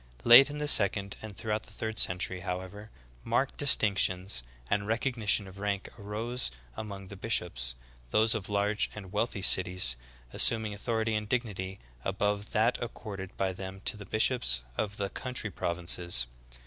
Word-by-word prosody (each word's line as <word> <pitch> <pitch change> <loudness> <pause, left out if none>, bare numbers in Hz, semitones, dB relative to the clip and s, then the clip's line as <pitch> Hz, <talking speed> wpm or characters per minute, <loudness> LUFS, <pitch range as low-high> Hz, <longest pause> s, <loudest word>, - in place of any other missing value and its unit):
Late 120 +4 +9
in 145 - -6
the 150 0 -2
sec 100 -7 +5
ond, 100 0 -6
and 110 -3 -9
throughout 110 -1 -2
the - - -12
third 110 0 -3
century, 90 +1 +1
however, 95 +4 -6 0.3
marked 120 +4 0
distinctions 100 - +1 0.3
and 100 +8 0
recognition 110 -3 +1
of 95 +1 -12
rank 100 -1 -2
arose 115 - -3 0.3
among 100 -3 -7
the 100 - -8
bish 110 +4 +1
ops, - - -3 0.3
those 110 - +4
of 105 -4 -3
large 105 +1 +1
and 95 -4 -9
wealthy 105 -2 -1
cities 90 -10 +4 0.4
assuming 110 -2 +3
authority 110 +1 -1
and 105 -1 -2
dignity 100 -6 -2 0.3
above 105 +2 -1
that 115 +3 +2
accorded 100 -5 -7
by 95 -1 0
them 95 +1 -7
to - - +2
the 105 -2 -10
bishops 110 - +2
of 105 +5 -2
the 100 -1 -2
country 125 -3 -3
provinces. 85 -6 +2
105 Hz, 160 wpm, -30 LUFS, 95-110 Hz, 0.4 s, Late